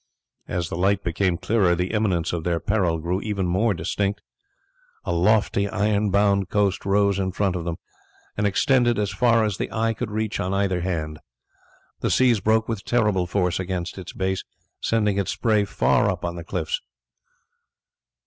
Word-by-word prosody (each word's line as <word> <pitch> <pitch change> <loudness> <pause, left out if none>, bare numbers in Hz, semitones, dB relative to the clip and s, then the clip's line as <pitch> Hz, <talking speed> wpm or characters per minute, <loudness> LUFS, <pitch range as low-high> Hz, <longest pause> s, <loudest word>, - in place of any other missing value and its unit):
As 85 -2 -2
the - - -4
light 100 +2 +1
became 85 +1 0
clearer 95 -5 +2
the 90 +2 -2
imminence 95 -7 0
of 85 -2 -2
their 85 -1 0
peril 90 -5 +1
grew 85 +4 -2 0.2
more 95 +4 +1
distinct. 100 +5 -2 0.9
A - - -1
lofty 100 +2 +2
iron 105 +1 +1
bound 100 -1 +2
coast 100 -2 0
rose 100 0 +2
in 95 -1 -1
front 95 0 0
of 85 -2 -4
them, 85 -1 -2 0.6
and 105 0 +1
extended 120 +3 +2
as 105 -1 0
far 115 +3 +3
as 105 -3 -2
the - - -3
eye 115 0 0
could 115 0 -4
reach 110 0 -2
on 95 +2 -1
either 95 -3 0
hand. 80 -4 -3 0.8
The - - -1
seas 125 -4 +3
broke 110 +3 +2
with 115 -4 -3
terrible 105 -7 +1
force 90 -1 0
against 95 0 -4
its 90 - -8
base, 95 0 -2 0.4
sending 105 -3 +1
its 100 - -1
spray 110 -3 +1
far - - +2
up - - -3
on 85 0 -3
the 85 - -6
cliffs. 85 -2 -3
100 Hz, 170 wpm, -23 LUFS, 90-105 Hz, 0.9 s, far